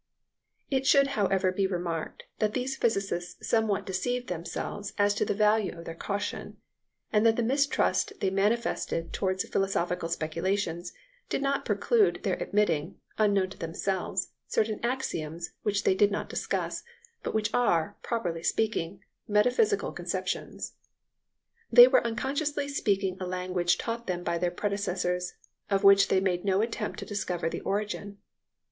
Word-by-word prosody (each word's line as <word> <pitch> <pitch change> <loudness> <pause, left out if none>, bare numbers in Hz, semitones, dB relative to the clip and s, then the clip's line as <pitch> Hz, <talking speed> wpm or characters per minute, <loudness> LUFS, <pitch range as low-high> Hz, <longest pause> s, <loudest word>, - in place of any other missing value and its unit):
It 265 -1 +1
should 275 0 +5
however 195 -3 +2
be 190 +1 +1
remarked 175 -3 -3 0.2
that 215 -1 +1
these 260 +1 -1
physicists 195 -7 -1
somewhat 210 -3 +1
deceived 245 +7 -2
themselves 180 +4 -4
as 205 0 +3
to 205 - 0
the - - -1
value 210 -3 +2
of 170 - -9
their 165 - -5
caution, 200 +4 -4 0.6
and 210 0 +4
that 225 -1 +5
the 235 - 0
mistrust 280 - +1
they 190 - +1
manifested 195 -4 0
towards 190 -1 -1
philosophical 180 -3 0
speculations 170 +2 -2 0.4
did - - -1
not 275 0 0
preclude 450 -4 +2
their - - +1
admitting, 175 -5 0 0.2
unknown 200 -3 +3
to - - -11
themselves, 185 +3 -2 0.2
certain 215 -1 0
axioms 170 -10 -2
which 205 -1 0
they - - +4
did 200 +2 +4
not 205 - -3
discuss, - - -2 0.4
but - - -4
which 215 0 0
are, 205 -6 +2
properly 175 -9 -2
speaking, 195 -2 -1 0.2
metaphysical 250 - +2
conceptions. - - -4 1.0
They - - +11
were - - +4
unconsciously 280 +5 -1
speaking 195 -8 0
a 185 - -3
language 180 -1 0
taught 230 +1 -4
them 175 -1 -2
by 170 -1 -1
their 180 - +1
predecessors, 180 -2 -2 0.4
of 195 0 +1
which 195 0 +7
they 190 - +3
made 180 -2 0
no 195 0 +2
attempt 230 +1 -3
to - - -6
discover 180 -5 -2
the - - -4
origin. 205 0 -3
200 Hz, 145 wpm, -28 LUFS, 180-225 Hz, 1.0 s, They